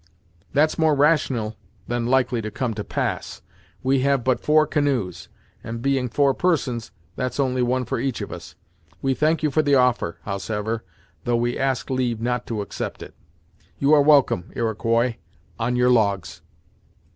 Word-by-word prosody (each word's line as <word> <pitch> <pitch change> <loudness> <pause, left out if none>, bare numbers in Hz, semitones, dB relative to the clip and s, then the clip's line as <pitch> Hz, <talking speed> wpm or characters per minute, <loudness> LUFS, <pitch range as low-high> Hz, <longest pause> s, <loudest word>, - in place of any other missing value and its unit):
"That's 155 +3 +2
more 160 -2 +4
rational, 140 -7 +2 0.3
than 120 -1 -1
likely 125 -2 +2
to 110 - -4
come 120 +1 -2
to 105 -1 -4
pass. - - -3 0.4
We 135 +1 +2
have 135 -1 +2
but 130 0 +1
four 155 0 +4
canoes, 140 - -1 0.3
and 115 0 -5
being 130 0 0
four 140 +4 +3
persons 130 -9 0 0.3
that's 125 +2 -3
only 130 -2 +1
one 125 +1 +1
for - - -2
each 135 -3 -2
of - - -5
us. - - -9 0.5
We 135 -1 +2
thank 155 +4 +1
you 150 - +2
for 155 - +3
the 145 -2 +3
offer, 125 -10 +2
howsever, 105 +2 -3 0.4
though 120 -1 +2
we 120 +1 0
ask 135 0 -1
leave 125 -3 0
not 125 +1 -2
to 110 -3 -2
accept 100 - -5
it. - - -12 0.6
You 140 +2 +3
are 150 - +7
welcome, 135 - +3
Iroquois, 115 +1 0 0.4
on 120 +2 0
your 125 0 +3
logs." 100 -7 +1
125 Hz, 165 wpm, -23 LUFS, 115-140 Hz, 0.6 s, are